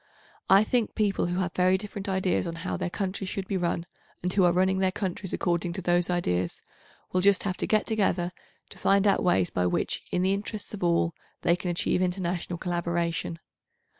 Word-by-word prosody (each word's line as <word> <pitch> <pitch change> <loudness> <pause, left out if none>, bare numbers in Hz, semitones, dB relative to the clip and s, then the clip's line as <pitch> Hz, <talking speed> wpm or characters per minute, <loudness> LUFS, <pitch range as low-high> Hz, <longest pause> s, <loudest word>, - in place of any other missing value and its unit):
I 195 +2 +7
think 235 0 0
people 205 -5 +1
who 175 +1 -2
have 180 -1 -2
very 185 +1 +3
different 200 0 -6
ideas 190 -1 +1
on 165 - -4
how - - -1
their - - -2
countries 190 +1 -3
should 190 -1 -4
be 200 - -2
run, 170 -2 -1 0.4
and 180 0 -1
who 195 - +4
are 175 - +5
running 190 +2 +2
their 190 -1 +2
countries 190 -1 -4
according 175 -1 0
to 190 - -3
those 175 0 +2
ideas, 90 - -1 0.5
will 185 - +3
just 200 0 +4
have 190 -2 -1
to - - -2
get 215 -1 +2
together, 190 -5 +1 0.4
to - - -12
find 200 +1 +3
out 200 - +4
ways 95 - +2
by 90 0 +1
which, - - -1
in 180 - +1
the 190 +1 +3
interests 205 +1 -4
of 195 - -5
all, 170 -1 +2 0.3
they 170 - +4
can 180 0 -4
achieve 175 +1 +1
international 180 -1 -1
collaboration. 170 -1 -2
180 Hz, 200 wpm, -27 LUFS, 175-195 Hz, 0.5 s, I